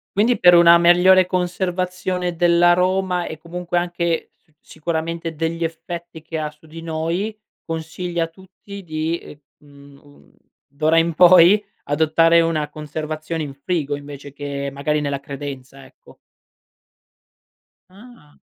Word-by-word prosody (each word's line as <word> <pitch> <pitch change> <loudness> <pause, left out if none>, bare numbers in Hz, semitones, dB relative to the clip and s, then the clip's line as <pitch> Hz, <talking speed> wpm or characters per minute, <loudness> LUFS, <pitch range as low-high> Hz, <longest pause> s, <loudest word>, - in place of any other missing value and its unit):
Quindi, 225 +5 +2
per 175 0 +6
una 170 0 +7
migliore 180 +2 +5
conservazione 180 0 -2
dell'aroma, 175 +1 +2
e 160 - -7
comunque 175 +1 -3
anche 175 -1 -2
s - - -38
sicuramente 165 +1 -4
degli 165 +2 -3
effetti 165 0 -6
che 160 +1 -6
ha 150 -1 -3
su 150 +1 -22
di 165 +1 -10
noi, 165 +6 -3 0.3
consigli 165 +2 -5
a 165 - +1
tutti 190 +3 -13
di, 160 0 -2
ehm, - - -13 0.2
mhmm, 140 -1 -18
un 145 -1 -21 0.4
d'ora 155 +3 +1
in 165 0 0
poi, 180 +4 +7 0.2
adottare 160 +3 +3
una 155 -3 -1
conservazione 155 +1 -5
in 140 -3 -6
frigo, 145 0 -2
invece 145 -1 -11
che 140 -1 -5
magari 150 +2 -1
nella 140 -1 -2
credenza, 140 -1 -8
ecco. 130 0 -19 1.7
Ah. 200 -6 -18
165 Hz, 130 wpm, -20 LUFS, 150-175 Hz, 1.7 s, una